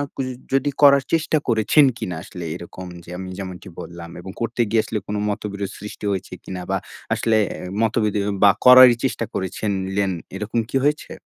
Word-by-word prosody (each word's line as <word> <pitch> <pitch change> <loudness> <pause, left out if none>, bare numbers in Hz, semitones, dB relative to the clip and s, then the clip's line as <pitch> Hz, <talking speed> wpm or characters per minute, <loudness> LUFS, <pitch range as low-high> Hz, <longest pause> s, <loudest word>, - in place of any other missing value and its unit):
কুজ 135 - -2 0.3
যদি 135 +1 +2
করার 140 -1 +7
চেষ্টা 160 -1 +2
করেছেন 115 +5 +4
কিনা 100 -7 -4
আসলে 90 -2 -8
এরকম 90 +1 -9 0.2
যে 85 - -14
আমি 95 0 -6
যেমনটি 95 -2 -7
বললাম 85 -1 -8
এবং 95 +2 -8
করতে 115 +1 -1
গিয়ে 110 +1 +3
আসলে 110 - -3
কোন 105 - -3
মতবিরোধ 100 -2 -4
সৃষ্টি 105 +1 -8
হয়েছে 95 -1 -4
কিনা 90 -1 -6
বা 95 - +1 0.4
আসলে 110 -1 +2
অ্যা 90 - -7 0.2
মতোবিরোধ 110 -2 +1 0.2
বা 100 - +9 0.2
করারই 125 -1 +10
চেষ্টা 130 -3 -1
করেছিলেন 95 0 -1 0.2
এরকম 105 +3 -2
কি - - -5
হয়েছে? 150 +1 0
105 Hz, 170 wpm, -22 LUFS, 95-120 Hz, 0.4 s, করারই